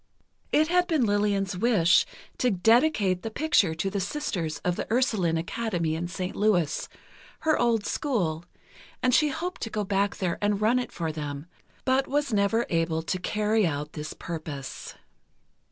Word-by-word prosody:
It 310 +1 +4
had 360 0 +3
been 310 -7 +2
Lillian's 205 -2 +1
wish 185 -4 +4 0.3
to 250 - +3
dedicate 215 - +3
the 225 - -4
picture 220 - +2
to 165 +4 -2
the 200 - -1
Sisters 190 - -2
of 180 -1 +1
the - - -5
Ursuline 215 -9 +2
Academy 175 -2 -2
in 165 +2 -2
St. 180 +1 -4
Louis, 185 -8 +1 0.5
her 315 -1 +2
old 230 -3 +2
school, 180 - -1 0.6
and 255 0 +3
she 300 +4 +4
hoped 355 +6 -4
to 225 - -3
go 215 -1 -2
back 200 0 0
there 180 -3 -2
and 205 -1 +1
run 225 +4 +3
it 250 - -4
for 165 -2 -3
them, 145 -1 -5 0.4
but 265 +1 +2
was 285 -3 0
never 210 +3 +2
able 165 -1 0
to 185 +3 -2
carry 210 +1 +1
out 150 -1 -4
this 150 0 -6
purpose. 155 -5 -6
200 Hz, 165 wpm, -27 LUFS, 170-240 Hz, 0.6 s, It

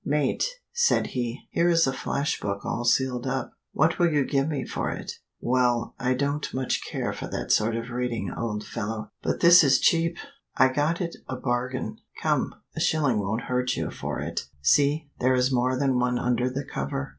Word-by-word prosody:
Mate," 150 - +1 0.3
said 475 0 +3
he, 120 0 -3
"here 170 +1 +2
is 165 -1 +4
a 135 - 0
flash 140 +3 -2
book 100 -1 -4
all 120 - -2
sealed 125 0 +1
up. 130 -1 -2 0.2
What 160 +3 +2
will 175 -1 +4
you 145 -3 +2
give 135 0 +1
me 150 -3 -2
for - - -2
it?" - - -5 0.3
"Well! 120 -1 +1
I 130 -1 +1
don't 140 +2 -1
much 130 -1 -1
care - - -3
for - - -6
that - - -3
sort 110 +1 +3
of 115 +1 -4
reading, 120 -6 -2
old 105 -2 -3
fellow." 110 +1 -4
"But - - -2
this 170 0 +8
is 135 -3 +5
cheap. 170 0 +2 0.4
I 130 - +6
got 150 +6 0
it 170 -1 -3
a 130 - -2
bargain. 125 -3 -2 0.3
Come - - +1 0.2
a - - -3
shilling 145 -8 +2
won't 105 +4 -1
hurt 125 0 -1
you - - -3
for - - -4
it. - - -4 0.2
See 145 - +3
there 130 +1 +3
is 125 +1 +2
more 130 0 +1
than 135 -2 +2
one 125 0 +1
under 125 +1 +1
the 135 +2 -4
cover." 135 0 -4
130 Hz, 195 wpm, -26 LUFS, 120-145 Hz, 0.4 s, this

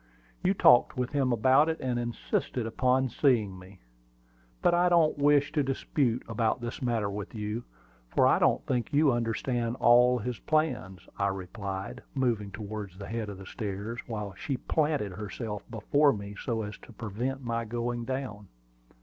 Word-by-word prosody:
You 190 +2 +2
talked 160 -9 +5
with 125 -1 -1
him 135 -3 +1
about 130 +6 +4
it, 160 - -2
and 125 -2 -1
insisted 120 0 -2
upon 130 +3 +2
seeing 115 -7 +1
me. 95 0 -15 0.8
But - - +4
I 175 +1 +4
don't 165 -4 +3
wish 145 0 +4
to 155 - +1
dispute 135 -2 0
about 115 +1 0
this 120 0 -6
matter 115 -5 0
with 100 +2 -6
you, 105 +2 -4 0.4
for - - +3
I - - +5
don't - - +2
think 125 -2 -1
you 145 0 +4
understand 120 0 -1
all 125 +1 +6
his 120 +1 -4
plans," 95 - -1
I 100 - +2
replied, 95 0 -5
moving 120 -6 0
towards 105 -2 -7
the 100 - -7
head 110 -2 -3
of 100 - -7
the 95 - -10
stairs, 105 +2 -5
while 105 -4 -4
she 130 +9 -3
planted 150 - 0
herself 105 +2 -5
before 140 +6 +3
me 100 -1 -6
so 115 -3 -1
as 105 0 -7
to - - -14
prevent 125 +5 -4
my 115 -1 -1
going 120 +1 -3
down. 120 -6 -4
120 Hz, 165 wpm, -29 LUFS, 105-130 Hz, 0.8 s, all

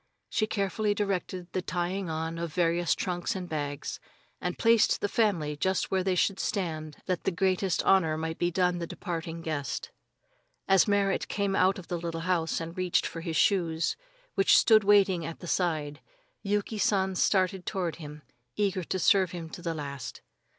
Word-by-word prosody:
She 215 -1 0
carefully 205 0 0
directed 185 -3 -3
the 185 - 0
tying 180 +1 -2
on 160 +1 -3
of 170 0 -3
the 150 - -16
various 175 -1 +2
trunks 175 -1 -2
and 185 -2 -4
bags, 145 -3 -4 0.4
and 180 0 -2
placed 230 -1 +4
the - - 0
family 190 -9 +1
just 190 +5 0
where 190 -1 +1
they 185 -1 +1
should 195 +2 +1
stand 155 -6 -3
that 185 -2 -2
the - - +2
greatest 185 0 +1
honor 165 -5 +3
might 160 0 -4
be 175 - +2
done 180 0 +1
the 170 - -4
departing 165 -2 -5
guest. 145 -5 -3 0.8
As 195 +1 +5
Merrit 200 -1 +1
came 200 -1 -1
out 185 +1 +3
of 185 - -10
the 175 - -3
little 165 -1 -4
house 165 -2 0
and 165 +1 -6
reached 185 -1 +1
for 165 - -5
his 165 -1 -4
shoes, 170 -4 +2 0.4
which 195 -2 +5
stood 220 -2 +6
waiting 195 -4 +4
at 165 +1 -5
the - - -9
side, 155 -5 -1 0.4
Yuki 205 +1 -1
San 190 -2 +2
started 185 0 +1
toward 180 -5 -2
him, 150 -2 -9 0.3
eager 195 -3 0
to 185 - -2
serve 185 0 +3
him 165 -2 -6
to - - -8
the 165 -1 -2
last. 140 -4 -6
180 Hz, 180 wpm, -28 LUFS, 165-195 Hz, 0.8 s, stood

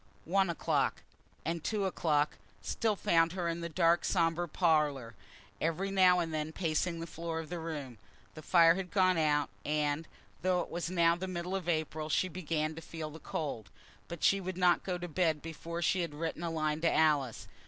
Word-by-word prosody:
One 190 +2 +2
o'clock, 170 - 0 0.4
and 165 -1 -2
two 210 -3 0
o'clock, 155 -5 +1 0.3
still 220 -2 0
found 165 -2 +2
her 180 -2 -2
in 170 0 -2
the 170 - -4
dark 170 +1 +3
sombre 170 -1 +1
parlour, 150 -8 +1 0.5
every 175 +5 -1
now 185 -2 +5
and 165 -2 -2
then 155 0 -2
pacing 165 0 -1
the 165 - -4
floor 165 0 -4
of 160 -2 -7
the 175 - -4
room. 145 -8 -6 0.3
The 155 - -9
fire 165 +1 +6
had 185 0 -4
gone 185 -3 +3
out, 150 -2 +2
and, 150 +1 0 0.3
though 180 -1 +2
it - - -7
was 170 0 -3
now 170 -2 +3
the 185 +2 -5
middle 180 +1 -3
of 180 -3 -3
April, 155 -1 -1
she 185 +4 +1
began 160 -3 -2
to 165 - -8
feel 160 -1 -6
the 160 - -10
cold. 140 -12 -4 0.4
But 170 -2 -7
she 195 0 +4
would 185 -1 -5
not 180 -1 +4
go 180 -2 -3
to 175 0 -5
bed 160 -2 +1
before 165 +2 -6
she 185 - +2
had 165 -4 -4
written 165 +1 -3
a 170 - -2
line 155 -1 -1
to 165 - +3
Alice. 150 -6 +2
165 Hz, 195 wpm, -32 LUFS, 155-180 Hz, 0.5 s, fire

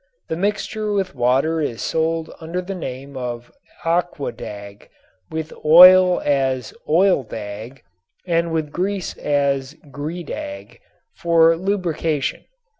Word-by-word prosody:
The - - -1
mixture 210 +3 -2
with 195 -2 -1
water 135 +6 +1
is 120 -6 -3
sold 160 0 -1
under 165 +3 -4
the 180 +2 -5
name 135 -5 -7
of 120 -2 -5 0.3
"aquadag," 130 -12 -3 0.4
with 160 0 -5
oil 180 +3 +8
as 130 -5 0 0.2
"oildag" 130 - 0 0.4
and 170 -1 0
with 160 -2 -2
grease 190 +2 -2
as 140 -1 0 0.2
"gredag," 135 - -6 0.3
for 165 -1 +4
lubrication. 165 -6 -2
160 Hz, 105 wpm, -21 LUFS, 130-175 Hz, 0.4 s, oil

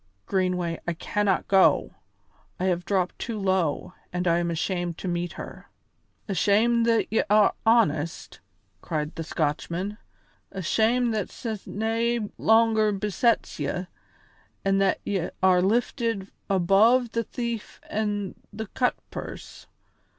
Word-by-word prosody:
Greenway, 180 -3 0
I 170 - +1
cannot 200 +3 0
go; 195 -1 +4 0.7
I - - -2
have 175 -2 0
dropped 185 -3 0
too 230 -2 -4
low, 185 -4 0 0.2
and 180 0 -2
I 170 0 +3
am 170 0 -1
ashamed 175 0 -2
to - - -6
meet 175 0 -2
her." - - -9 0.6
"Ashamed 220 +4 +3
that 230 -1 +3
ye 225 - +4
are 210 0 +5
honest?" 170 -9 +1 0.4
cried 155 -2 -3
the 165 - -5
Scotchman. 170 +7 -2 0.5
"Ashamed 225 +6 +1
that 210 -3 -2
sin 220 -4 -5
nae 230 +2 0 0.2
longer 220 -1 +4
besets 210 +2 0
ye, 150 +6 -2 0.8
an' 195 0 +3
that 195 -1 +2
ye 190 -4 -1
are 185 -1 +5
lifted 225 0 0 0.2
above 210 +6 +4
the 230 - -1
thief 235 -1 -5
an' 205 -2 -2 0.2
the 220 +2 -5
cutpurse! 250 -1 -4
195 Hz, 125 wpm, -26 LUFS, 180-225 Hz, 0.8 s, are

